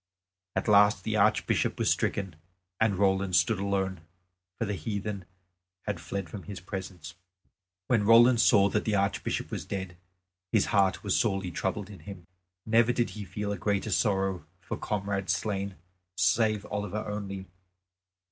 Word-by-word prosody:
At 95 - -1
last 105 -1 +5
the - - -1
Archbishop - - +2
was - - +2
stricken 95 -5 -1 0.4
and 110 -3 +3
Roland 95 -1 +2
stood 110 0 +3
alone, 95 -3 -1 0.6
for 115 - -1
the 105 - -2
heathen 100 -1 -4 0.6
had - - -3
fled 90 +3 -4
from 95 +5 -8
his 100 -2 -8
presence. 95 -2 -7 0.7
When 110 -5 +2
Roland 115 +1 +7
saw 100 -4 +5
that 105 +2 0
the 110 - 0
Archbishop 100 0 -1
was - - -3
dead, 95 -3 -5 0.5
his 110 -4 +3
heart 95 -2 +3
was 100 - +1
sorely 95 -5 0
troubled 95 +4 -3
in 95 - -11
him. 90 +2 -10 0.4
Never 115 +2 +4
did 120 -1 0
he 105 - -7
feel 100 +3 -4
a 100 - -4
greater 100 +1 -1
sorrow 95 -5 0
for - - -5
comrade 100 -2 -3
slain, 100 +1 -1 0.4
save 110 -2 +2
Oliver 105 0 -3
only. 100 -2 -5
100 Hz, 150 wpm, -28 LUFS, 95-105 Hz, 0.7 s, Roland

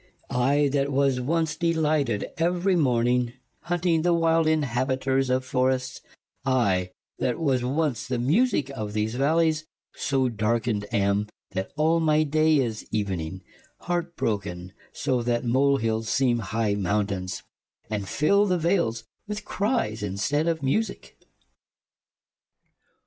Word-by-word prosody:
I 140 +4 +2
that 140 0 0
was 135 -2 +2
once 160 +3 0
delighted 155 -9 +1
every 180 +3 +2
morning 125 -5 +2
y 120 - -13 0.3
Hunting 175 -2 +1
the 175 +1 +3
wilde 165 -1 +3
inhabiters 130 -2 +1
of 130 0 +1
forrests 130 0 0 0.4
y 135 - 0 0.4
I - - -33 0.3
that 125 -1 0
was 135 -6 +1
once 140 -1 -1
the 130 -1 -1
musique 145 - +1
of 110 -6 -5
these 110 +1 -1
v 125 - -3
allies 160 +1 +2
y - - -66 0.2
So 135 -2 0
darkened 110 -1 -1
am 100 -2 +2
y 105 - -2 0.3
that 95 0 -3
all 160 +2 +3
my 155 -1 +3
day 155 +1 +3
is 115 -5 -2
evening 95 -4 -3 0.4
y - - -20
Hart 175 -1 -2
broken 95 -4 -3 0.2
so 130 - -1
y 120 - -2
that 120 -1 0
molehilles 120 -3 +1
seeme 120 0 +2
high 110 0 -1
mount 100 +1 0
aines 90 -1 -4
y 110 - -9
And 100 -1 -6
fill 200 +8 +3
the 180 -2 +2
vales 165 - 0 0.2
with 210 0 -5
cries 200 - -1
in 100 -1 -3
steed 145 +10 0
of 165 -3 -1
musique 215 +12 -1
130 Hz, 150 wpm, -25 LUFS, 115-160 Hz, 0.4 s, the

